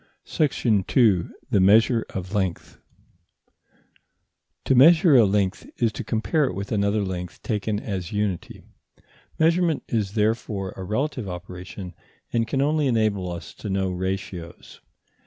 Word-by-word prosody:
§ 115 - +1
2. 105 -9 +3 0.2
THE 100 - +4
MEASURE 110 +5 +4
OF 95 +1 -6
LENGTH 95 -4 -3 1.9
To - - +3
measure 160 +4 +6
a 120 -4 +7
length 100 -1 -1
is 115 -2 +1
to 105 - -6
compare 140 +7 0
it 90 - -3
with 100 +1 -5
another 100 0 +1
length 90 -2 -6
taken 105 -1 -1
as 95 -5 -5
unity. 105 -4 -3 0.7
Measurement 165 -1 +2
is 105 -4 -1
therefore 105 -3 -1
a 95 - -7
relative 120 +2 -2
operation, 90 +1 -8 0.4
and 115 -1 +1
can 135 +3 0
only 150 0 +1
enable 105 -6 0
us 85 -1 -8
to 105 - -7
know 95 -1 0
ratios. 90 -2 -5
105 Hz, 135 wpm, -24 LUFS, 95-120 Hz, 1.9 s, a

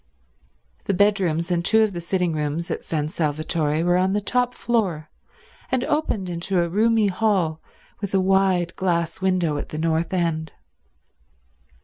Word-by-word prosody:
The 195 - 0
bedrooms 180 -4 +1
and 170 -1 +1
two 220 +4 +4
of 215 - +1
the 175 - -5
sitting 180 -1 0
rooms 155 +2 -2
at - - -3
San 150 -2 -2
Salvatore 155 0 -1
were 175 +1 +3
on 185 +1 +2
the 205 - +2
top 245 +4 0
floor, 185 -10 -1 0.6
and 255 -1 +1
opened 270 -11 -1
into 175 +2 -1
a 170 - +1
roomy 220 +3 +3
hall 185 -6 0 0.4
with 200 -1 -3
a - - +4
wide 190 -2 +2
glass 170 -2 -1
window 180 -5 +1
at - - -5
the 155 - -6
north 160 +1 0
end. 165 -3 -1
180 Hz, 155 wpm, -23 LUFS, 165-195 Hz, 0.6 s, two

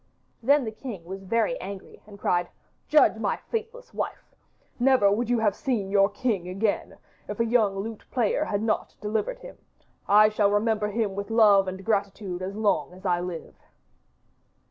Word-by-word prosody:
Then 280 +3 +3
the 220 - -3
king 215 -6 -8
was 190 +2 -7
very 230 - 0
angry 195 -1 -9
and 205 -1 -12
cried, 175 -3 0 0.4
'Judge 300 - +5
my - - -1
faithless 465 +2 -6
wife! - - -5 0.5
Never 245 -5 +4
would 230 +3 0
you 245 - +3
have 215 -3 +2
seen 220 -9 -2
your 195 0 +4
king 205 -4 -2
again, 200 +3 -1 0.3
if - - -6
a 230 - +3
young 220 -4 +2
lute 215 +2 -6
player 235 -5 +1
had 205 +1 -2
not 220 -1 -1
delivered 215 - -2
him. - - -12 0.5
I 210 +1 +6
shall 210 -1 +2
remember 210 0 +1
him 210 -1 -1
with 200 +1 -5
love 210 -4 +5
and 190 +1 -6
gratitude 200 -3 -1
as 190 +2 -4
long 200 -8 0
as 190 +2 -15
I 175 -2 +2
live. 175 -2 -6
210 Hz, 170 wpm, -26 LUFS, 195-230 Hz, 0.5 s, I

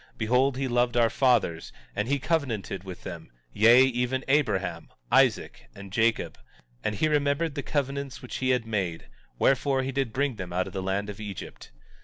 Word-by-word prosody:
Behold, 125 +4 +2
he 135 0 -1
loved 120 0 +1
our 115 -2 +4
fathers, 115 -12 +1 0.2
and 105 +2 -1
he 140 +2 +1
covenanted 125 - -2
with 95 -2 -9
them, 80 -1 -8 0.2
yea, 115 +4 +7
even 130 0 0
Abraham, 125 -9 0 0.2
Isaac, - - +2
and 100 -1 -11
Jacob; 115 +1 +1 0.4
and 105 - -1
he 155 - +1
remembered 145 +1 +1
the 140 - -3
covenants 140 -1 -3
which 125 - -7
he 130 - -1
had 125 -3 +2
made; 95 -7 -3 0.3
wherefore, 135 - +2
he 135 - -2
did 135 -3 -1
bring 135 -1 -1
them 90 -3 -6
out 90 +1 0
of 95 - -9
the 95 - -3
land 95 +2 -1
of 100 - -12
Egypt. 105 -3 -8
120 Hz, 180 wpm, -27 LUFS, 100-135 Hz, 0.4 s, yea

